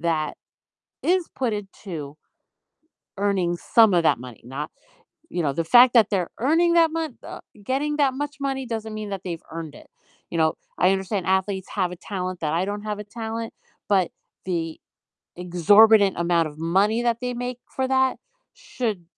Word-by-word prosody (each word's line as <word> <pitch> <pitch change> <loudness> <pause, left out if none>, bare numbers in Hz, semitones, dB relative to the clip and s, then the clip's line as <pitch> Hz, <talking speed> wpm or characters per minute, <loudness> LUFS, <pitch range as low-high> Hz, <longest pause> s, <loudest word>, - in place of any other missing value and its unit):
that 160 -2 -1 0.7
is 360 -1 +2
put 245 -4 +2
into 180 -7 -7 1.0
earning 190 -4 0
some 220 +5 +4
of 170 -1 +3
that 140 -6 +3
money, 125 -3 -10
not, 135 +5 -6 0.6
you 175 - -2
know, 140 - +1
the 165 +4 -2
fact 245 +6 +7
that 225 -4 +5
they're 185 -5 0
earning 330 +7 +3
that 330 -1 +5
mon 320 -5 -3
uh, - - -8 0.2
getting 285 +7 -1
that 280 -3 +3
much 290 +1 -4
money 270 -1 -2
doesn't 220 -2 -4
mean 215 -1 -5
that 195 -2 -4
they've 170 -3 -4
earned 165 -2 -7
it. - - -14 0.4
You 170 - -4
know, 160 -1 +3 0.2
I 185 - +4
understand 195 0 -1
athletes 190 0 0
have 185 -3 -1
a 180 - -8
talent 185 -1 -5
that 155 -1 -1
I 170 +2 +1
don't 205 +2 -4
have 210 -1 -4
a - - -5
talent, 225 +1 -5 0.4
but 190 -4 +3 0.3
the 165 -3 -3 0.6
exorbitant 200 +4 +5
amount 170 -1 +2
of 150 -1 -12
money 195 +8 +2
that 235 -1 +1
they 250 0 -3
make 245 0 -4 0.2
for 265 - 0
that 265 0 +2 0.4
should 245 - -4
200 Hz, 175 wpm, -24 LUFS, 170-245 Hz, 1.0 s, fact